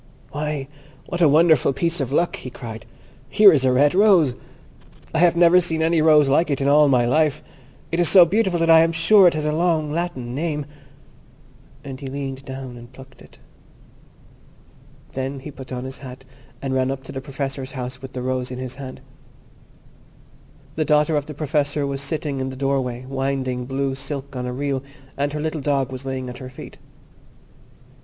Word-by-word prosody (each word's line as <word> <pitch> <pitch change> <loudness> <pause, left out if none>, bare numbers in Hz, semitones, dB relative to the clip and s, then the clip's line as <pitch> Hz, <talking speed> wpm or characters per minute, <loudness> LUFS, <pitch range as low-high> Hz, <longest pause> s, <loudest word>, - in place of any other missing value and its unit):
"Why, 150 -2 -3 0.4
what 175 - -4
a 160 - +6
wonderful 155 -2 +4
piece 170 +4 -1
of 135 -2 -3
luck!" 170 +4 +1
he 130 - -8
cried; 115 -2 -9 0.4
"here 210 -2 +7
is 140 -4 +2
a 130 - +3
red 140 +3 +3
rose! 185 - +4 0.8
I 160 - 0
have 175 0 +4
never 175 +1 +5
seen 160 -2 -1
any 165 0 +2
rose 155 -2 +5
like 150 +4 +2
it 140 - -1
in 135 - 0
all 150 +1 +5
my 125 -3 +3
life. 150 +3 +1 0.5
It 165 - -1
is 175 - +5
so 185 -3 +8
beautiful 190 -1 0
that 165 - +2
I 165 - +8
am 165 +1 +3
sure 185 +4 +5
it 170 - +2
has 155 -1 -2
a 150 - +1
long 160 -2 0
Latin 150 -8 -4
name"; 150 0 -3 1.2
and 135 -2 -8
he 140 - -7
leaned 135 0 -5
down 130 -2 -8
and 120 +1 -13
plucked 130 0 -15
it. - - -17 1.7
Then 135 +1 -4
he 150 - -8
put 135 -2 -11
on 125 -1 -4
his 130 +1 -7
hat, 130 -1 -11 0.4
and 135 -1 -2
ran 130 0 +1
up 135 0 -4
to 135 - -9
the 135 -1 -6
Professor's 135 -1 -5
house 130 -1 -6
with 135 -1 -10
the 125 - -5
rose 130 0 -2
in 125 - -6
his 130 -1 -6
hand. 130 -1 -9 1.8
The 155 - +2
daughter 150 +1 +2
of 145 -1 -1
the 150 - -8
Professor 145 -1 -1
was 140 0 -3
sitting 140 -1 -3
in 130 0 -2
the 130 - -7
doorway 130 -2 -2
winding 135 -2 -2
blue 135 +1 -2
silk 135 0 -5
on 125 0 -4
a - - -3
reel, 135 +1 -2 0.3
and 145 +1 -1
her 150 - -3
little 155 0 -3
dog 135 -2 0
was 130 +1 -7
lying 130 -1 -4
at 125 0 -8
her 130 - -8
feet. 130 - -12
140 Hz, 195 wpm, -22 LUFS, 130-155 Hz, 1.8 s, so